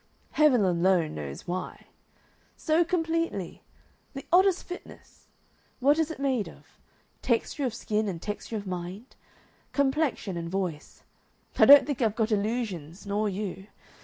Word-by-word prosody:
Heaven 285 Hz, -8 st, +4 dB
alone 175 Hz, -2 st, +2 dB
knows 70 Hz, -2 st, -7 dB
why. 180 Hz, +1 st, -5 dB, 0.7 s
So 320 Hz, +1 st, +2 dB
completely! 330 Hz, -, -2 dB, 0.5 s
The 275 Hz, -, -7 dB
oddest 370 Hz, 0 st, +4 dB
fitness! 360 Hz, -, -11 dB, 0.5 s
What 285 Hz, +4 st, +3 dB
is 320 Hz, -1 st, +1 dB
it 320 Hz, -, -6 dB
made 265 Hz, -6 st, -1 dB
of? -, -, -16 dB, 0.6 s
Texture 255 Hz, +4 st, 0 dB
of 245 Hz, -, -2 dB
skin 215 Hz, -1 st, -1 dB
and 175 Hz, -3 st, -5 dB
texture 210 Hz, +4 st, -5 dB
of 205 Hz, -, -6 dB
mind? 185 Hz, +5 st, -6 dB, 0.6 s
Complexion 275 Hz, -, 0 dB
and 170 Hz, 0 st, -4 dB
voice. 180 Hz, -5 st, -4 dB, 0.6 s
I -, -, +8 dB
don't 285 Hz, 0 st, +9 dB
think 285 Hz, -3 st, -3 dB
I've 220 Hz, -3 st, +1 dB
got 225 Hz, -1 st, 0 dB
illusions, 205 Hz, -6 st, -2 dB
nor 205 Hz, +1 st, 0 dB
you.... 195 Hz, 0 st, -5 dB
215 Hz, 135 wpm, -27 LUFS, 185-280 Hz, 0.7 s, don't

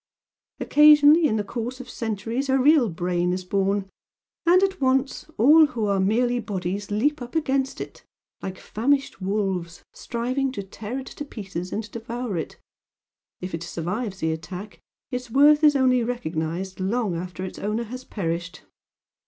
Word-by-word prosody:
Occasionally, 300 Hz, +2 st, +6 dB
in 220 Hz, -, 0 dB
the 210 Hz, -, 0 dB
course 240 Hz, +4 st, -5 dB
of 255 Hz, -, -8 dB
centuries 230 Hz, +3 st, -3 dB
a 265 Hz, -, +4 dB
real 275 Hz, -3 st, +5 dB
Brain 175 Hz, +1 st, -1 dB
is 185 Hz, 0 st, -3 dB
born 195 Hz, +1 st, 0 dB, 0.6 s
and 365 Hz, +3 st, +6 dB
at 385 Hz, -3 st, 0 dB
once, 265 Hz, +1 st, +1 dB
all 305 Hz, +7 st, +7 dB
who 235 Hz, -7 st, -3 dB
are 200 Hz, -1 st, +1 dB
merely 240 Hz, +5 st, +2 dB
Bodies 195 Hz, -2 st, -4 dB
leap 265 Hz, +8 st, 0 dB
up 245 Hz, +3 st, -8 dB
against 270 Hz, -4 st, 0 dB
it, -, -, -8 dB, 0.4 s
like 190 Hz, 0 st, -5 dB
famished 275 Hz, 0 st, -1 dB
wolves, 190 Hz, -3 st, -2 dB
striving 255 Hz, +3 st, -2 dB
to 200 Hz, -, -4 dB
tear 210 Hz, +5 st, -6 dB
it 265 Hz, -, -5 dB
to 295 Hz, -, -7 dB
pieces 195 Hz, -9 st, -6 dB
and 220 Hz, -, -2 dB
devour 230 Hz, -1 st, -4 dB
it 165 Hz, -, -5 dB, 0.8 s
if 180 Hz, +1 st, -5 dB
it 165 Hz, -, -3 dB
survives 185 Hz, +5 st, -4 dB
the 160 Hz, 0 st, +1 dB
attack 180 Hz, +3 st, -7 dB, 0.3 s
its 250 Hz, -1 st, -4 dB
worth 295 Hz, +5 st, +5 dB
is 295 Hz, -1 st, +6 dB
only 255 Hz, -2 st, +3 dB
recognised 185 Hz, -5 st, -3 dB
long 200 Hz, 0 st, 0 dB
after 180 Hz, +2 st, -5 dB
its 185 Hz, -, -8 dB
owner 215 Hz, +3 st, -1 dB
has 255 Hz, +3 st, -8 dB
perished. 170 Hz, -4 st, -4 dB
225 Hz, 160 wpm, -24 LUFS, 185-260 Hz, 0.8 s, all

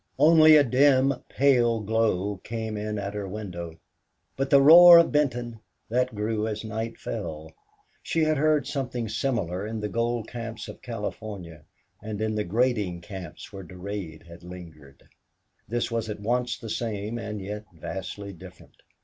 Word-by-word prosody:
Only 155 Hz, +2 st, +7 dB
a 150 Hz, -, +7 dB
dim, 135 Hz, +1 st, +4 dB, 0.2 s
pale 120 Hz, -4 st, +3 dB
glow 105 Hz, -2 st, 0 dB
came 110 Hz, +2 st, -5 dB
in 105 Hz, 0 st, -3 dB
at 100 Hz, 0 st, -4 dB
her 105 Hz, -1 st, -4 dB
window. 90 Hz, -5 st, -7 dB, 0.6 s
But 135 Hz, 0 st, -2 dB
the 140 Hz, -, +7 dB
roar 170 Hz, +5 st, +10 dB
of 170 Hz, -, +5 dB
Benton 120 Hz, -6 st, -1 dB, 0.3 s
that 125 Hz, 0 st, 0 dB
grew 105 Hz, +1 st, -1 dB
as 110 Hz, 0 st, -4 dB
night 110 Hz, +1 st, -4 dB
fell. 80 Hz, -7 st, -6 dB, 0.5 s
She 165 Hz, -, 0 dB
had 155 Hz, 0 st, +2 dB
heard 155 Hz, 0 st, +2 dB
something 125 Hz, -4 st, -3 dB
similar 105 Hz, -5 st, -2 dB
in 110 Hz, 0 st, -4 dB
the 105 Hz, 0 st, -3 dB
gold 115 Hz, 0 st, -1 dB
camps 115 Hz, -2 st, -7 dB
of -, -, -10 dB
California 105 Hz, -, -7 dB, 0.4 s
and 105 Hz, 0 st, -6 dB
in 110 Hz, 0 st, -1 dB
the 105 Hz, 0 st, -1 dB
grading 105 Hz, -3 st, 0 dB
camps 90 Hz, 0 st, -9 dB
where 95 Hz, -, -7 dB
Durade 90 Hz, -2 st, -7 dB
had 85 Hz, 0 st, -13 dB
lingered; 85 Hz, -6 st, -12 dB, 0.6 s
this 120 Hz, +1 st, -2 dB
was 115 Hz, -1 st, -2 dB
at 105 Hz, -, -5 dB
once 120 Hz, +4 st, -1 dB
the 115 Hz, -4 st, -7 dB
same 110 Hz, 0 st, -3 dB
and 105 Hz, -2 st, -5 dB
yet 105 Hz, +2 st, -6 dB
vastly 95 Hz, +4 st, -7 dB
different. 85 Hz, -, -15 dB
110 Hz, 160 wpm, -26 LUFS, 100-120 Hz, 0.6 s, roar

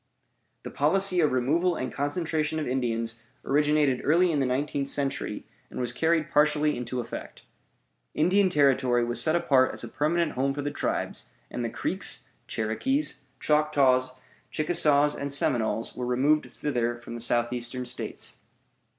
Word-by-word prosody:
The -, -, -7 dB
policy 185 Hz, +5 st, +3 dB
of 155 Hz, -3 st, +3 dB
removal 155 Hz, +8 st, +1 dB
and 130 Hz, -, -4 dB
concentration 155 Hz, +1 st, -2 dB
of 155 Hz, -, -2 dB
Indians 115 Hz, -3 st, -2 dB, 0.2 s
originated 145 Hz, -2 st, +2 dB
early 170 Hz, +4 st, +3 dB
in 150 Hz, -, 0 dB
the 135 Hz, -, +1 dB
nineteenth 140 Hz, +2 st, -1 dB
century, 140 Hz, -1 st, -1 dB, 0.2 s
and -, -, -7 dB
was 125 Hz, -1 st, -1 dB
carried 160 Hz, -1 st, +1 dB
partially 150 Hz, 0 st, +3 dB
into 125 Hz, +1 st, -4 dB
effect. 120 Hz, -, -7 dB, 0.7 s
Indian 185 Hz, +5 st, +3 dB
Territory 130 Hz, -6 st, +2 dB
was 120 Hz, 0 st, +1 dB
set 160 Hz, +1 st, +2 dB
apart 135 Hz, -6 st, +3 dB
as -, -, -5 dB
a -, -, -5 dB
permanent 165 Hz, +2 st, 0 dB
home 135 Hz, +2 st, -1 dB
for 145 Hz, -, -4 dB
the 145 Hz, -, -2 dB
tribes, -, -, -3 dB, 0.3 s
and -, -, -4 dB
the -, -, -2 dB
Creeks, -, -, -1 dB, 0.2 s
Cherokees, 140 Hz, -, 0 dB
Choctaws, 140 Hz, -4 st, +2 dB, 0.4 s
Chickasaws, 150 Hz, -2 st, +2 dB
and 140 Hz, 0 st, -5 dB
Seminoles 115 Hz, -5 st, 0 dB
were 125 Hz, -1 st, -4 dB
removed 140 Hz, +5 st, +1 dB
thither 120 Hz, -5 st, -2 dB
from 120 Hz, 0 st, -10 dB
the 120 Hz, -, -6 dB
Southeastern 120 Hz, +1 st, -1 dB
States. 125 Hz, 0 st, -4 dB
140 Hz, 150 wpm, -27 LUFS, 125-155 Hz, 0.7 s, policy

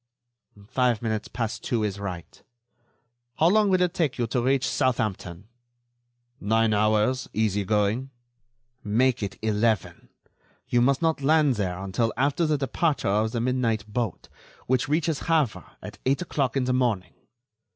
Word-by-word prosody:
"Five 120 Hz, -2 st, +1 dB
minutes 110 Hz, -2 st, -2 dB
past 115 Hz, -3 st, -4 dB
two 120 Hz, -4 st, -1 dB
is 100 Hz, -1 st, -2 dB
right. 90 Hz, -4 st, -7 dB, 1.0 s
How 165 Hz, -, +4 dB
long 210 Hz, +1 st, +3 dB
will 185 Hz, -1 st, +3 dB
it 180 Hz, -1 st, 0 dB
take 155 Hz, -8 st, -1 dB
you 120 Hz, -, 0 dB
to 120 Hz, +2 st, -1 dB
reach 130 Hz, +1 st, +1 dB
Southampton?" 105 Hz, -8 st, -1 dB, 0.9 s
"Nine 110 Hz, +1 st, +2 dB
hours, 110 Hz, +5 st, +1 dB
easy 105 Hz, -2 st, 0 dB
going." 105 Hz, +5 st, 0 dB, 0.7 s
"Make 120 Hz, +4 st, +1 dB
it 100 Hz, -1 st, -4 dB
eleven. 110 Hz, -3 st, 0 dB, 0.6 s
You 120 Hz, -, +2 dB
must 135 Hz, +5 st, +2 dB
not 160 Hz, -3 st, +1 dB
land 150 Hz, -1 st, +4 dB
there 95 Hz, -5 st, -2 dB
until 100 Hz, +4 st, -1 dB
after 145 Hz, +5 st, +1 dB
the 155 Hz, -1 st, +1 dB
departure 140 Hz, -, 0 dB
of 105 Hz, +2 st, +1 dB
the 120 Hz, -, -2 dB
midnight 120 Hz, -4 st, 0 dB
boat, 110 Hz, -3 st, -3 dB, 0.4 s
which 130 Hz, +1 st, 0 dB
reaches 155 Hz, 0 st, 0 dB
Havre 155 Hz, -9 st, +1 dB, 0.2 s
at -, -, -9 dB
eight 140 Hz, +7 st, +1 dB
o'clock 135 Hz, -7 st, -1 dB
in 135 Hz, -, +1 dB
the 125 Hz, 0 st, 0 dB
morning. 110 Hz, -9 st, 0 dB
120 Hz, 150 wpm, -25 LUFS, 105-135 Hz, 1.0 s, How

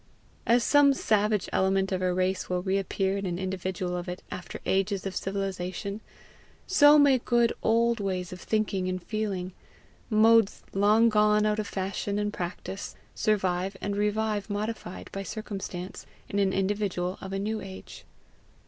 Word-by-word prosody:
As 235 Hz, +1 st, +4 dB
some 285 Hz, -1 st, +5 dB
savage 210 Hz, -4 st, +1 dB
element 190 Hz, 0 st, +2 dB
of 185 Hz, -1 st, -1 dB
a 185 Hz, 0 st, +1 dB
race 185 Hz, +1 st, -1 dB
will 180 Hz, -1 st, -1 dB
reappear 195 Hz, 0 st, 0 dB
in 195 Hz, -1 st, -3 dB
an 175 Hz, -1 st, -2 dB
individual 185 Hz, -1 st, -3 dB
of 175 Hz, 0 st, -4 dB
it 180 Hz, -, -6 dB
after 180 Hz, -, -7 dB
ages 195 Hz, 0 st, 0 dB
of 190 Hz, -1 st, -4 dB
civilization, 195 Hz, +1 st, -3 dB, 0.6 s
so 295 Hz, -5 st, +7 dB
may 280 Hz, -3 st, +5 dB
good 240 Hz, -1 st, +2 dB
old 230 Hz, +1 st, +2 dB
ways 185 Hz, -2 st, -3 dB
of 180 Hz, -, -9 dB
thinking 205 Hz, -4 st, 0 dB
and 185 Hz, -1 st, -3 dB
feeling, 195 Hz, -4 st, -3 dB, 0.6 s
modes 225 Hz, -1 st, +4 dB
long 210 Hz, +4 st, +4 dB
gone 210 Hz, 0 st, +3 dB
out 215 Hz, 0 st, +1 dB
of 210 Hz, -, -2 dB
fashion 200 Hz, +1 st, -3 dB
and 210 Hz, 0 st, -1 dB
practice, 180 Hz, +2 st, -5 dB, 0.2 s
survive 190 Hz, -2 st, 0 dB
and 205 Hz, 0 st, -3 dB
revive 210 Hz, 0 st, 0 dB
modified 205 Hz, -2 st, -4 dB
by 195 Hz, -, -4 dB
circumstance, 195 Hz, -3 st, -6 dB, 0.2 s
in 205 Hz, -, -2 dB
an 195 Hz, -1 st, +3 dB
individual 190 Hz, -2 st, -1 dB
of 190 Hz, -, -7 dB
a 195 Hz, -, -2 dB
new 215 Hz, +2 st, -2 dB
age. 190 Hz, -1 st, -10 dB
195 Hz, 155 wpm, -28 LUFS, 185-215 Hz, 0.6 s, so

